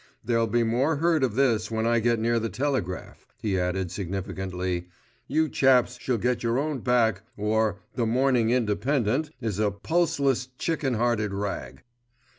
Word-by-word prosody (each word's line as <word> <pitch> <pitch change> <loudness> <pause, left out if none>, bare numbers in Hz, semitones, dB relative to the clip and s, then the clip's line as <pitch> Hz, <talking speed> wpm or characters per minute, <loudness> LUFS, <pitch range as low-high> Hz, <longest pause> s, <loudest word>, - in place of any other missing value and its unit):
There'll 115 0 +2
be 120 +2 +2
more 125 +7 +1
heard 160 0 +2
of 120 -5 0
this 125 -5 +2
when 110 0 -1
I 115 0 +3
get 120 +1 +2
near 115 +1 +1
the 115 0 -2
telegraph," 130 -10 -3
he 100 -4 0
added 90 0 -1
significantly. 95 -2 -3 0.4
"You 160 0 +2
chaps 125 -3 +3
shall 125 -2 0
get 125 +3 0
your 115 +1 0
own 145 0 -1
back, 115 -5 +2 0.2
or* 105 -1 0
The 115 -2 0
Morning 125 -1 +2
Independent* 125 +4 +1
is 105 -3 -2
a 105 -1 +3
pulseless, 140 - 0
chicken 150 -6 -1
hearted 110 -3 0
rag." 95 -10 -4
115 Hz, 155 wpm, -26 LUFS, 105-130 Hz, 0.4 s, I